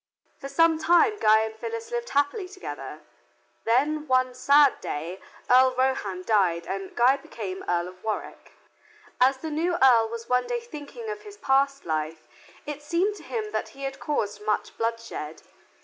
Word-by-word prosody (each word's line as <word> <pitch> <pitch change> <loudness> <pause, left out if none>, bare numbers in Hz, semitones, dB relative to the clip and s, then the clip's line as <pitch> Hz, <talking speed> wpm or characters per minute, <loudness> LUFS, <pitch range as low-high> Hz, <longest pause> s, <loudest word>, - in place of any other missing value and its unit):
For 275 - -6
some 325 +2 +3
time 410 +6 +4
Guy 215 0 +5
and 220 0 -3
Phyllis 460 - -6
lived 475 0 -3
happily 285 +8 0
together. 145 - -8 0.6
Then 295 +6 +1
one 255 -1 +2
sad 280 +2 +4
day 165 +6 -5 0.3
Earl 255 +1 +5
Rohand 210 -8 -1
died 180 -6 +2
and 195 0 -5
Guy 250 +3 +4
became 195 -8 -7
Earl 175 0 +1
of 185 0 -17
Warwick. 220 -1 -5 0.7
As 260 +2 +4
the 315 +3 -6
new 335 +4 0
earl 235 -4 +5
was 230 0 -7
one 250 0 +1
day 485 -1 -1
thinking 450 +1 -9
of 420 0 -7
his 415 -1 -12
past 275 -3 +1
life, 155 0 -3 0.4
it 295 0 -6
seemed 345 +7 0
to - - -13
him 430 -2 -4
that - - -2
he 275 - -8
had 270 0 -4
caused 210 -8 -2
much 210 0 -1
bloodshed. 230 -9 -4
260 Hz, 165 wpm, -26 LUFS, 215-320 Hz, 0.7 s, Guy